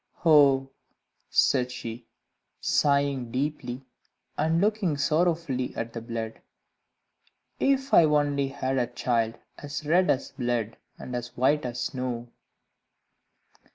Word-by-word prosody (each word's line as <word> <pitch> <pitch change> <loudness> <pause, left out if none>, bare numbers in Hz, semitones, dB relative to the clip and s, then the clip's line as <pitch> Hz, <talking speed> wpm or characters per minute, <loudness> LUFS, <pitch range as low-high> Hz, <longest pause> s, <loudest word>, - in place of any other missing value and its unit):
"Oh," 140 -4 +5 0.6
said 125 -2 +2
she, 115 -1 -7 0.5
sighing 140 -4 +1
deeply 130 -1 -3 0.5
and 160 +2 +1
looking 200 -6 +1
sorrowfully 155 -4 0
at 115 0 -4
the 115 - -5
blood, 115 -1 -5 1.2
"if 270 0 +1
I 165 - +8
only 145 -2 +2
had 135 -1 -2
a 120 - 0
child 115 -2 -1 0.2
as 145 +1 -6
red 180 +5 +3
as 135 - 0
blood, 120 -3 -2 0.2
and 125 - -7
as 120 0 -6
white 135 +2 +2
as 120 0 -5
snow!" 125 -2 -3
135 Hz, 115 wpm, -27 LUFS, 120-150 Hz, 1.2 s, I